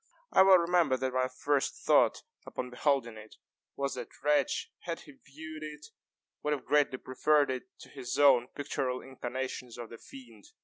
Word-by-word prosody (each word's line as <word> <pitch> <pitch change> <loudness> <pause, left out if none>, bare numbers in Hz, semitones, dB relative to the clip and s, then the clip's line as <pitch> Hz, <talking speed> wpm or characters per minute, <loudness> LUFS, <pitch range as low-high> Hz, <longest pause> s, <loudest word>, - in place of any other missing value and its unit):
I - - +6
well 190 -1 +8
remember 170 -6 +2
that 130 0 -2
my 130 0 +2
first 135 +2 0
thought, - - +3 0.2
upon 125 0 -5
beholding 125 -3 0
it, 110 0 -12 0.4
was 140 0 -2
that 125 -2 -6
Retzch, 150 0 +1
had 170 -1 -5
he 150 - -13
viewed 155 +3 -11
it, 150 -1 -8 0.5
would 150 - 0
have 140 - -4
greatly 145 -3 +2
preferred 145 +2 +2
it 130 -1 -4 0.2
to - - -12
his 130 -3 -5
own 130 -4 +6
pictural 130 -3 -3
incarnations 130 -1 -5
of 120 -1 -8
the 115 - -10
fiend. 120 -6 -14
135 Hz, 170 wpm, -31 LUFS, 125-150 Hz, 0.5 s, well